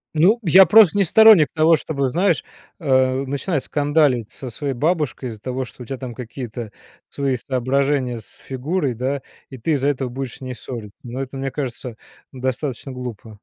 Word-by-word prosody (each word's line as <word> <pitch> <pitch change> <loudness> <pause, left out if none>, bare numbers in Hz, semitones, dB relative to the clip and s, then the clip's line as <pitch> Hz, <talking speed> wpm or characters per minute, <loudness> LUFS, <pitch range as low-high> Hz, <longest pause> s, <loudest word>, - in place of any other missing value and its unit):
Ну, 195 +10 +4
я 185 +1 +7
просто 205 -1 +7
не 195 - +3
сторонник 220 -5 +7
того, 160 +1 +5
чтобы, 140 -3 -2
знаешь, 180 +8 +1 0.4
э, 130 -3 +2
начинать 140 +2 -2
скандалить 145 -6 +1
со 130 -3 -8
своей 140 +2 -3
бабушкой 150 -3 -1
из-за 110 -2 -10
того, 130 0 -3
что 125 - -14
у - - -7
тя 135 - -4
там 125 -2 -7
какие-то 120 -2 -7 0.4
свои 135 -2 -1
соображения 130 0 0
с 105 - -10
фигурой, 135 +1 -2
да, 130 +4 -3 0.3
и 130 - -9
ты 155 +8 -2
из-за 140 -1 +1
этого 135 -3 -1
будешь 130 0 -5
с - - -23
ней 130 -1 -5
ссориться. 115 -4 -9
Но 125 +2 -7
это, 135 0 -5
мне 135 0 -2
кажется, 125 -4 -5 0.4
достаточно 130 +1 -4
глупо. 120 -3 -7
135 Hz, 180 wpm, -21 LUFS, 125-150 Hz, 0.4 s, я